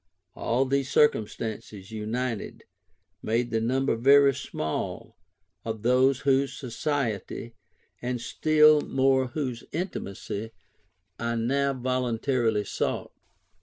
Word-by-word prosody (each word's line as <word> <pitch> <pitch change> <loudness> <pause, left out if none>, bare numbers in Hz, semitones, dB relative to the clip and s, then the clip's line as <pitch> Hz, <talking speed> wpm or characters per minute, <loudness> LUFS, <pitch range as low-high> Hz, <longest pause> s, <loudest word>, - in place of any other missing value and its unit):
All 125 +4 0
these 135 0 0
circumstances 110 -7 0
united, 110 +2 -3 0.6
made 120 +2 0
the 115 -1 +1
number 130 +2 +1
very 140 +3 +6
small 80 -9 -4 0.5
of 110 -1 -5
those 130 +2 +3
whose 140 0 +1
society, 120 -4 -3 0.5
and 125 0 -2
still 155 +4 +4
more 130 -1 +2
whose 125 -2 -4
intimacy, 110 - -5 0.7
I 115 0 -1
now 140 +4 +1
voluntarily 125 -3 0
sought. - - -2
125 Hz, 95 wpm, -27 LUFS, 115-135 Hz, 0.7 s, very